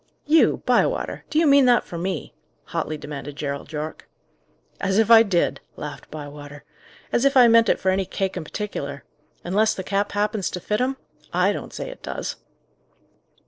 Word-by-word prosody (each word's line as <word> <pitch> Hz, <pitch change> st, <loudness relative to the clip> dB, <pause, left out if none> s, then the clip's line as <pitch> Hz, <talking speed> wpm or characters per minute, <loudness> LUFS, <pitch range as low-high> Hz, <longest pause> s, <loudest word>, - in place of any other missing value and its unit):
"You, 315 Hz, +2 st, +4 dB
Bywater! -, -, +1 dB
do 305 Hz, -, -2 dB
you 325 Hz, -, +5 dB
mean 280 Hz, -2 st, +6 dB
that 245 Hz, -1 st, +4 dB
for -, -, -10 dB
me?" 185 Hz, +2 st, -4 dB, 0.3 s
hotly 155 Hz, -, -3 dB
demanded 145 Hz, -1 st, -7 dB
Gerald 140 Hz, 0 st, -5 dB
Yorke. 155 Hz, 0 st, -6 dB, 0.7 s
"As 195 Hz, 0 st, 0 dB
if 225 Hz, +1 st, +3 dB
I 225 Hz, -1 st, +10 dB
did!" 195 Hz, -6 st, +1 dB, 0.2 s
laughed 150 Hz, 0 st, -8 dB
Bywater. 145 Hz, -1 st, -9 dB, 0.5 s
"As 240 Hz, -, +2 dB
if 275 Hz, 0 st, +3 dB
I 245 Hz, -2 st, +8 dB
meant 230 Hz, 0 st, +5 dB
it -, -, +2 dB
for 190 Hz, -, +1 dB
any 190 Hz, 0 st, 0 dB
cake 190 Hz, +1 st, -3 dB
in 180 Hz, -, -4 dB
particular! 145 Hz, -7 st, -5 dB, 0.4 s
Unless 205 Hz, +5 st, +2 dB
the 190 Hz, -, -5 dB
cap 200 Hz, +2 st, -1 dB
happens 210 Hz, -1 st, 0 dB
to 180 Hz, -, -5 dB
fit 210 Hz, +6 st, -1 dB
'em. 265 Hz, +1 st, 0 dB, 0.4 s
I -, -, +3 dB
don't -, -, -7 dB
say -, -, -6 dB
it -, -, -10 dB
does." -, -, -5 dB
195 Hz, 180 wpm, -23 LUFS, 150-230 Hz, 0.7 s, I